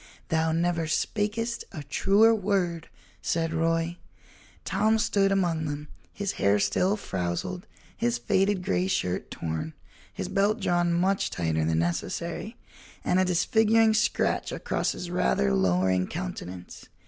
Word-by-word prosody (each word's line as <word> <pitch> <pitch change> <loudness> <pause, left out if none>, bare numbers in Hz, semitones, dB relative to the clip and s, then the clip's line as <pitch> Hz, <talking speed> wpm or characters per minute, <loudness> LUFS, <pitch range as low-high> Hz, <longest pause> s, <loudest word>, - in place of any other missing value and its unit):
"Thou 160 0 +1
never 165 0 0
spakest 215 +7 -1
a 150 - -7
truer 200 +10 +4
word," 185 -6 -1 0.3
said 165 -1 -1
Roy. 165 +1 0 0.7
Tom 220 +1 +2
stood 200 -3 +2
among 175 -5 +1
them, 150 0 -5 0.2
his 200 -1 -3
hair 100 +1 +4
still 180 - +1
frowzled, 95 - -3 0.3
his 120 0 0
faded 190 +10 +1
gray 185 -1 0
shirt 90 - -1
torn, 85 - -4 0.4
his - - -5
belt 200 +3 +1
drawn 175 -3 +1
much 185 +3 +1
tighter 80 -2 -1
than 80 0 +1
necessary, 165 - -2 0.5
and 180 - +2
a 185 - +3
disfiguring 220 +5 +3
scratch 215 - +1
across - - -1
his 175 -1 -6
rather 65 - +1
lowering 90 +5 +2
countenance. 125 - -7
170 Hz, 130 wpm, -27 LUFS, 120-195 Hz, 0.7 s, truer